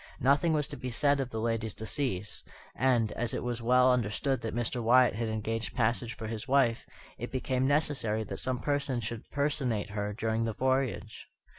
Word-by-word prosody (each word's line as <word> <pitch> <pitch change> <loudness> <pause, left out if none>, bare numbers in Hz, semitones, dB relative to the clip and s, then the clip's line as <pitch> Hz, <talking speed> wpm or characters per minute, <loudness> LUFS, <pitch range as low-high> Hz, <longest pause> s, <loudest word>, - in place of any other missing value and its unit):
Nothing 140 +6 +3
was 150 -3 +1
to - - -4
be 125 - -4
said 140 +3 +2
of 135 -2 -2
the 110 - -4
lady's 115 -1 -1
decease; 110 -4 -2 0.3
and, 120 -5 +2
as 120 -1 -1
it - - -3
was 120 -1 -3
well 125 +2 +5
understood 125 +3 0
that 115 0 -4
Mr. 120 +1 -1
Wyatt 125 +2 +5
had 115 +2 -2
engaged 110 -2 -3
passage 120 +1 0
for 110 - -7
his 110 +2 -5
wife, 130 -4 +2 0.3
it - - -5
became 130 0 0
necessary 140 -7 +1
that - - -6
some 130 -1 0
person 140 -3 0
should 115 0 -6
personate 135 -8 -1
her 105 0 -2
during 110 +1 -1
the 115 - -2
voyage. 130 -3 -1
120 Hz, 185 wpm, -30 LUFS, 110-130 Hz, 0.3 s, well